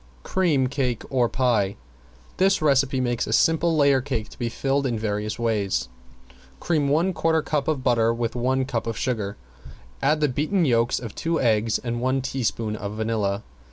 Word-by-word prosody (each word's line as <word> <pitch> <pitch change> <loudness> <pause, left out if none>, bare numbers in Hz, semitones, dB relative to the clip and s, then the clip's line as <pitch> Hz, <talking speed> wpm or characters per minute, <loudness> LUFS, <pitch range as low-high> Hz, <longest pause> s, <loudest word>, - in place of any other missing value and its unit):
~CREAM 165 -8 +1
CAKE 125 -3 -1
OR 125 -3 +2
PIE~ 110 -7 +1 0.6
This 195 +1 +3
recipe 135 -3 +2
makes 120 -2 -1
a - - -3
simple 165 0 +3
layer 140 -2 +4
cake 120 -5 -3
to - - -15
be 120 - -1
filled 135 +3 0
in 120 -3 -1
various 105 0 -2
ways. 100 - -1 0.7
Cream 155 -4 0
one 170 +6 +2
quarter 160 -2 +1
cup 145 -3 -1
of 150 -5 -1
butter 115 -3 +3
with 115 0 -2
one 130 +2 +1
cup 115 -3 -3
of 115 - -3
sugar, 105 -5 -2 0.6
add 155 0 +2
the 150 - +3
beaten 155 +7 0
yolks 120 -3 +2
of 115 -4 -7
two 165 0 -1
eggs 110 -2 +2
and 120 -1 -4
one 130 +1 +1
teaspoon 115 -5 -2
of 105 0 -5
vanilla. 110 -2 -1
125 Hz, 175 wpm, -24 LUFS, 115-140 Hz, 0.7 s, layer